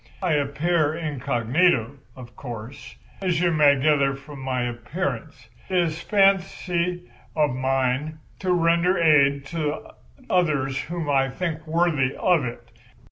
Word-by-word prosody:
I 180 Hz, -, +1 dB
appear 150 Hz, +2 st, +1 dB
incognito, 140 Hz, -3 st, +1 dB, 0.2 s
of 120 Hz, -2 st, -12 dB
course, 120 Hz, 0 st, -9 dB, 0.3 s
as 180 Hz, -4 st, 0 dB
you 175 Hz, 0 st, +2 dB
may 145 Hz, -3 st, +4 dB
gather 140 Hz, -1 st, +2 dB
from 140 Hz, +1 st, -11 dB
my 130 Hz, -2 st, -2 dB
appearance. 120 Hz, 0 st, -5 dB, 0.2 s
It 185 Hz, -, 0 dB
is 170 Hz, -2 st, 0 dB
a -, -, -13 dB
fancy 180 Hz, -, +1 dB, 0.2 s
of 150 Hz, -3 st, +2 dB
mine 130 Hz, +3 st, -1 dB, 0.2 s
to 185 Hz, -1 st, -1 dB
render 170 Hz, +1 st, +2 dB
aid 140 Hz, -4 st, +4 dB
to 155 Hz, -2 st, -3 dB, 0.4 s
others 140 Hz, -7 st, +1 dB
whom 170 Hz, -1 st, -5 dB
I 135 Hz, -2 st, +2 dB
think 160 Hz, +2 st, -4 dB
worthy 155 Hz, -5 st, +1 dB
of 175 Hz, -5 st, +2 dB
it. 120 Hz, -, -8 dB
150 Hz, 135 wpm, -24 LUFS, 135-170 Hz, 0.4 s, may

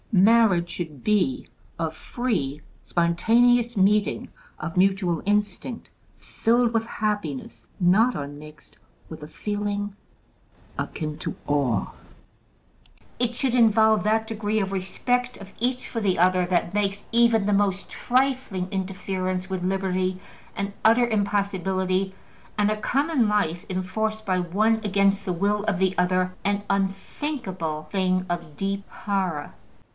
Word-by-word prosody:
Marriage 195 Hz, -3 st, +5 dB
should 155 Hz, -7 st, -6 dB
be 210 Hz, +6 st, +1 dB, 0.3 s
a -, -, 0 dB
free, 190 Hz, -, -2 dB, 0.2 s
spontaneous 230 Hz, +8 st, +3 dB
meeting 200 Hz, +2 st, +2 dB, 0.3 s
of 155 Hz, +2 st, -5 dB
mutual 185 Hz, -3 st, +2 dB
instinct, 210 Hz, +4 st, -1 dB, 0.3 s
filled 235 Hz, +1 st, +1 dB
with 225 Hz, -1 st, +2 dB
happiness 160 Hz, -, -3 dB
not 210 Hz, +8 st, +4 dB
unmixed 145 Hz, +1 st, -9 dB, 0.3 s
with 160 Hz, -, -9 dB
a -, -, -7 dB
feeling 205 Hz, +3 st, -3 dB, 0.8 s
akin 155 Hz, -1 st, -4 dB
to -, -, -4 dB
awe: 135 Hz, -8 st, +1 dB, 1.3 s
it 240 Hz, -1 st, 0 dB
should 255 Hz, -1 st, 0 dB
involve 220 Hz, -2 st, +5 dB
that 220 Hz, +1 st, +1 dB
degree 215 Hz, -1 st, -1 dB
of 195 Hz, -2 st, -1 dB
respect 245 Hz, +6 st, -1 dB
of 195 Hz, -1 st, -11 dB
each 250 Hz, +2 st, -1 dB
for 230 Hz, -, -3 dB
the 195 Hz, -3 st, +1 dB
other 180 Hz, +1 st, +3 dB
that 175 Hz, 0 st, 0 dB
makes 200 Hz, -1 st, 0 dB
even 230 Hz, -3 st, +4 dB
the 205 Hz, -, +2 dB
most 200 Hz, -1 st, +1 dB
trifling 250 Hz, -7 st, 0 dB
interference 185 Hz, -1 st, -3 dB
with 190 Hz, -2 st, -3 dB
liberty 185 Hz, 0 st, 0 dB, 0.4 s
an 200 Hz, 0 st, -2 dB
utter 230 Hz, +2 st, +5 dB
impossibility, 190 Hz, -3 st, 0 dB, 0.4 s
and 210 Hz, 0 st, +3 dB
a -, -, +1 dB
common 265 Hz, +2 st, +1 dB
life 175 Hz, -5 st, 0 dB
enforced 215 Hz, +4 st, -2 dB
by 185 Hz, -2 st, +1 dB
one 210 Hz, +6 st, +2 dB
against 200 Hz, -1 st, +2 dB
the 185 Hz, -, -2 dB
will 200 Hz, +4 st, 0 dB
of 215 Hz, -4 st, +1 dB
the 190 Hz, 0 st, +1 dB
other 185 Hz, 0 st, +1 dB
an 200 Hz, +1 st, 0 dB
unthinkable 195 Hz, -, -2 dB
thing 185 Hz, -1 st, +1 dB
of 170 Hz, -4 st, -4 dB
deep 195 Hz, 0 st, -2 dB
horror. 190 Hz, -7 st, -2 dB
195 Hz, 130 wpm, -25 LUFS, 185-220 Hz, 1.3 s, Marriage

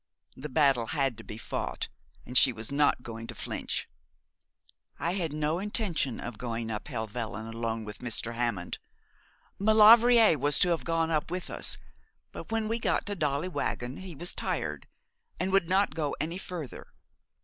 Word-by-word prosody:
The 150 Hz, +3 st, -7 dB
battle 135 Hz, -4 st, +3 dB
had 135 Hz, -4 st, 0 dB
to -, -, -9 dB
be 105 Hz, -, -8 dB
fought, -, -, -4 dB, 0.4 s
and 125 Hz, -, -9 dB
she 130 Hz, -, +8 dB
was 110 Hz, +1 st, -6 dB
not 145 Hz, -3 st, +2 dB
going 115 Hz, -1 st, -7 dB
to -, -, -6 dB
flinch. -, -, -3 dB, 1.1 s
'I 170 Hz, -, -1 dB
had 175 Hz, -5 st, -2 dB
no 155 Hz, +2 st, -1 dB
intention 195 Hz, -, -1 dB
of 120 Hz, -3 st, -6 dB
going 115 Hz, -2 st, -3 dB
up 105 Hz, -1 st, -5 dB
Helvellyn 110 Hz, 0 st, -4 dB
alone 115 Hz, 0 st, -3 dB
with 105 Hz, -1 st, -8 dB
Mr. 115 Hz, -1 st, -1 dB
Hammond. 115 Hz, -7 st, -2 dB, 0.8 s
Maulevrier 220 Hz, -, +7 dB
was 145 Hz, +2 st, +2 dB
to 180 Hz, -, +5 dB
have 170 Hz, -2 st, 0 dB
gone 165 Hz, -1 st, +1 dB, 0.2 s
with 180 Hz, +1 st, -4 dB
us; -, -, +3 dB, 0.5 s
but -, -, -9 dB
when 225 Hz, -1 st, 0 dB
we 225 Hz, +2 st, -1 dB
got -, -, 0 dB
to 205 Hz, -, -2 dB
Dolly 150 Hz, -1 st, 0 dB
Waggon 130 Hz, -7 st, -3 dB
he 185 Hz, -3 st, -8 dB
was 175 Hz, +5 st, -2 dB
tired, -, -, -2 dB, 0.5 s
and 185 Hz, +1 st, 0 dB
would 190 Hz, -3 st, +3 dB
not 195 Hz, +2 st, +3 dB
go 150 Hz, -3 st, -2 dB
any 165 Hz, +5 st, -2 dB
further. 170 Hz, -8 st, -7 dB
150 Hz, 165 wpm, -29 LUFS, 115-180 Hz, 1.1 s, she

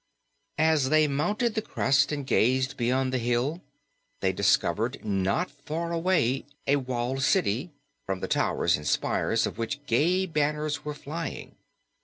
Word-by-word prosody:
As 155 Hz, -4 st, +3 dB
they 155 Hz, 0 st, +4 dB
mounted 205 Hz, -, 0 dB
the 220 Hz, -, -1 dB
crest 140 Hz, -8 st, +1 dB
and 145 Hz, -2 st, -3 dB
gazed 130 Hz, +3 st, +2 dB
beyond 130 Hz, +1 st, 0 dB
the 130 Hz, -, +1 dB
hill, 120 Hz, +8 st, 0 dB, 0.6 s
they -, -, +1 dB
discovered -, -, +1 dB
not 95 Hz, +4 st, 0 dB
far 155 Hz, +4 st, -5 dB
away 165 Hz, -7 st, +1 dB, 0.2 s
a 140 Hz, -, +3 dB
walled 130 Hz, 0 st, -2 dB
city, 130 Hz, -, +1 dB, 0.4 s
from 95 Hz, -1 st, -2 dB
the -, -, -3 dB
towers 85 Hz, +1 st, +1 dB
and 75 Hz, -, -7 dB
spires -, -, +1 dB
of -, -, -5 dB
which 140 Hz, +5 st, -4 dB
gay 175 Hz, +10 st, +2 dB
banners 150 Hz, -2 st, -1 dB
were 150 Hz, -1 st, -4 dB
flying. 160 Hz, +4 st, -6 dB
140 Hz, 145 wpm, -27 LUFS, 125-155 Hz, 0.6 s, they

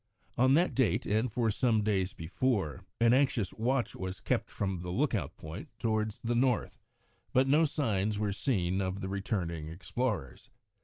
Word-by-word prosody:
On 130 Hz, +2 st, +5 dB
that 175 Hz, +3 st, +3 dB
date, 130 Hz, -6 st, +2 dB
and 110 Hz, +3 st, +1 dB
for 115 Hz, -1 st, +1 dB
some 110 Hz, -1 st, +2 dB
days 95 Hz, -3 st, 0 dB
before, 90 Hz, -, -1 dB, 0.2 s
an 115 Hz, 0 st, +5 dB
anxious 130 Hz, -6 st, +2 dB
watch 120 Hz, +3 st, 0 dB
was 95 Hz, 0 st, -5 dB
kept -, -, -1 dB
from 95 Hz, -3 st, -2 dB
the 90 Hz, -, -5 dB
lookout 90 Hz, -, -1 dB
point 80 Hz, +1 st, -8 dB
towards 110 Hz, 0 st, -1 dB
the 120 Hz, +1 st, 0 dB
north, 125 Hz, -1 st, +1 dB, 0.5 s
but 130 Hz, +1 st, +4 dB
no 150 Hz, +4 st, +5 dB
signs 110 Hz, -9 st, 0 dB
were 105 Hz, -1 st, 0 dB
seen 95 Hz, -5 st, 0 dB
of 95 Hz, +1 st, -2 dB
the 95 Hz, -, -3 dB
returning 90 Hz, -5 st, -2 dB
explorers. 90 Hz, -, -3 dB
105 Hz, 160 wpm, -31 LUFS, 95-125 Hz, 0.5 s, On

